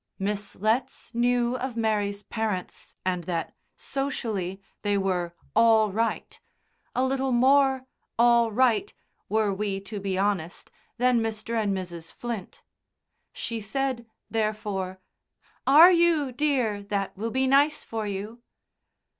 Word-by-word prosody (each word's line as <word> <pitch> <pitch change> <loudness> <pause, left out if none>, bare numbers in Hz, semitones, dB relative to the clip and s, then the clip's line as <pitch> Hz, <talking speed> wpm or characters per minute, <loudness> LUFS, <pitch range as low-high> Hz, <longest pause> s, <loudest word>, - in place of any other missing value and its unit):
Miss 200 +1 -3
Letts 225 +4 -1
knew 240 +1 +2
of 255 -2 -4
Mary's 205 -2 0
parents, 215 -5 -4
and 180 -2 -1
that, 170 -2 -3 0.2
socially, 220 -9 -3 0.2
they 205 -1 +1
were 180 -3 -1 0.2
"all 220 -2 +5
right" 225 +3 -2 0.6
a 255 - +2
little 265 0 0
more 265 +1 +4 0.3
"all 235 -1 +5
right," 255 - +2 0.4
were 215 -2 +2
we 195 0 -2
to 205 +1 -6
be 195 -1 -2
honest, 190 -4 -2 0.3
than 250 0 +3
Mr. 225 0 -3
and 220 -3 +1
Mrs. 175 -3 -7
Flint. 235 -6 -6 0.7
She 230 -1 -5
said, 255 +2 -2 0.2
therefore: 210 -4 -2 0.7
"Are 315 +7 +9
you, 335 -6 +3
dear? 250 -7 0
That 200 -1 -3
will 220 +4 -3
be 260 +3 +1
nice 285 +3 +3
for 220 -2 -4
you." 205 +4 -5
220 Hz, 125 wpm, -26 LUFS, 200-250 Hz, 0.7 s, Are